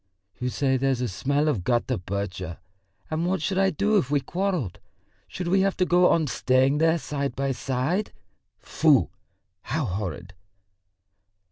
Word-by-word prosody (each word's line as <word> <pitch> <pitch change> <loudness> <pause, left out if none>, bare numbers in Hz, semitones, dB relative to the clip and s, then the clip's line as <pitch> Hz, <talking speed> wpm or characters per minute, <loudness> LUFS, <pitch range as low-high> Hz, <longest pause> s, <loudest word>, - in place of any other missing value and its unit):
You 125 - -1
say 130 +1 +1
there's 130 -1 0
a 125 - 0
smell 140 +9 0
of 115 -12 0
gutta 120 -2 0
percha? 95 -2 -4 0.5
And 160 +2 0
what 190 +1 0
should 190 +4 -1
I 195 0 +4
do 205 +5 +1
if 135 - -3
we 145 0 +2
quarrelled 175 - -2 0.5
should 180 - -5
we 190 +2 +3
have 195 0 +1
to 185 - +2
go 180 0 +4
on 165 -2 +3
staying 130 +1 +2
there 165 +1 +3
side 140 -3 -3
by 135 0 -1
side? 135 - -1 0.5
Foo, - - +2 0.5
how 155 -3 -2
horrid!" 95 -2 -4
140 Hz, 155 wpm, -25 LUFS, 125-175 Hz, 0.5 s, I